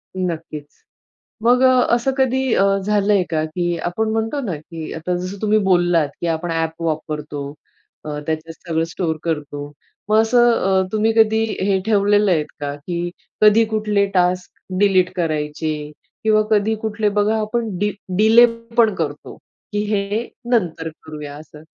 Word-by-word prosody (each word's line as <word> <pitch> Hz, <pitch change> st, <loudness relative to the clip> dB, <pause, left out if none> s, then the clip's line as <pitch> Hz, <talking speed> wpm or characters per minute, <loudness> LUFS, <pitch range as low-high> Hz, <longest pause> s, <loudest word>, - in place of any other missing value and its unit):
नक्कीच. 165 Hz, -5 st, -4 dB, 0.8 s
मग 245 Hz, +2 st, +4 dB
असं 255 Hz, 0 st, +3 dB
कधी 265 Hz, -1 st, +1 dB
अ, -, -, +3 dB, 0.2 s
झालंय 205 Hz, -2 st, +2 dB
का, 155 Hz, -2 st, 0 dB
की 175 Hz, +2 st, -2 dB
आपण 215 Hz, +7 st, -2 dB
म्हणतो 225 Hz, +6 st, -1 dB
ना, 200 Hz, -, -3 dB
की 160 Hz, +1 st, -8 dB
आता 165 Hz, +3 st, -2 dB
जसं 185 Hz, +2 st, -5 dB
तुम्ही 215 Hz, 0 st, +3 dB
बोललात, 175 Hz, -5 st, +3 dB
की 175 Hz, -, -1 dB
आपण 165 Hz, +1 st, -2 dB
ॲप 165 Hz, 0 st, -2 dB
वापरतो. 150 Hz, -2 st, -3 dB, 0.6 s
अ, -, -, -5 dB, 0.2 s
त्याच्यात 160 Hz, +1 st, -3 dB, 0.2 s
सगळं 165 Hz, -1 st, 0 dB
स्टोअर 165 Hz, -2 st, -2 dB
करतो. 145 Hz, -3 st, -4 dB, 0.4 s
मग 215 Hz, -, +4 dB
असं 240 Hz, +1 st, +4 dB
अ, 190 Hz, -4 st, +2 dB
तुम्ही 220 Hz, +1 st, +2 dB
कधी 220 Hz, 0 st, +4 dB, 0.2 s
हे 195 Hz, 0 st, +2 dB
ठेवलेलं 205 Hz, -1 st, +3 dB
आहेत 155 Hz, -4 st, +2 dB
का? 145 Hz, -1 st, -3 dB
की 170 Hz, +4 st, -4 dB, 0.3 s
कधी 215 Hz, +1 st, +6 dB
कुठले 210 Hz, -2 st, +1 dB
टास्क 180 Hz, 0 st, +1 dB, 0.3 s
डिलीट 190 Hz, -3 st, +3 dB
करायचे 150 Hz, -2 st, -2 dB, 0.3 s
किंवा 215 Hz, -1 st, +4 dB
कधी 215 Hz, +1 st, +2 dB
कुठले 215 Hz, -1 st, 0 dB
बघा 210 Hz, +2 st, +3 dB
आपण 225 Hz, +1 st, -2 dB
डि 205 Hz, +3 st, 0 dB, 0.3 s
डिले 220 Hz, +3 st, +7 dB, 0.3 s
पण 225 Hz, -3 st, +5 dB
करतो, 150 Hz, -3 st, -4 dB, 0.4 s
की 205 Hz, -, 0 dB
हे 210 Hz, +2 st, -1 dB, 0.2 s
नंतर 170 Hz, -8 st, 0 dB
करूया 150 Hz, -2 st, -8 dB
असं. 150 Hz, 0 st, -13 dB
185 Hz, 150 wpm, -20 LUFS, 160-215 Hz, 0.8 s, डिले